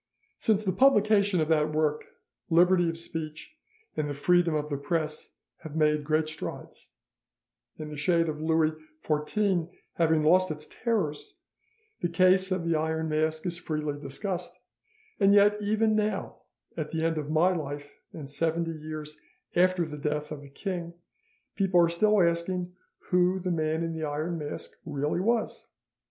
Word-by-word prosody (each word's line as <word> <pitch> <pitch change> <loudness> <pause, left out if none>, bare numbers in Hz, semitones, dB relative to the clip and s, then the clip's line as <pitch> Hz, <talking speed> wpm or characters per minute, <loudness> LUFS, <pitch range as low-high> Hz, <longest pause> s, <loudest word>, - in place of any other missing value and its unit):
"Since 215 -1 +2
the 190 - +2
publication 210 -6 +4
of 155 - 0
that 155 -1 +2
work, 150 -1 0 0.4
liberty 175 +1 +4
of 165 - -4
speech 160 - -6 0.4
and 150 -1 -1
the 145 - -3
freedom 175 +2 +3
of 150 0 -1
the - - 0
press 155 +1 -3 0.2
have 155 -1 -10
made 150 -1 +2
great 155 +1 +1
strides, 155 - -7 0.9
and 155 -1 -7
the - - -6
shade 165 +3 +2
of 155 -1 -4
Louis 160 0 +2 0.3
XIV 170 +3 0 0.3
having 160 -2 +3
lost 185 +4 +4
its 155 -1 -5
terrors, 195 -8 -2 0.6
the 175 - 0
case 185 +2 +4
of 185 -3 -1
the 165 -1 +1
Iron 160 +1 -1
Mask 155 +1 0
is 170 -1 -2
freely 150 -3 -3
discussed, 175 +6 -4 0.6
and 200 0 +5
yet 205 +1 +5
even 215 +1 +2
now, 215 -1 -1 0.4
at 155 -2 -3
the 160 0 -1
end 165 -1 0
of 150 -1 -5
my 175 +4 +3
life 145 -2 -6
and 150 -4 -8
seventy 165 +3 -1
years 155 -1 -7 0.3
after 180 -1 +3
the 150 -1 -7
death 150 0 -2
of 150 -2 -6
the 140 - -12
king, 170 +2 -5 0.6
people 190 -3 +3
are 170 -1 +5
still 210 +5 +3
asking 175 +1 -1 0.4
who 180 +1 +3
the 185 -1 -2
Man 160 0 0
in 165 0 -2
the 160 -1 -3
Iron 155 +3 -3
Mask 150 -1 -6
really 150 +1 -2
was. 230 +4 -1
165 Hz, 160 wpm, -28 LUFS, 155-185 Hz, 0.9 s, and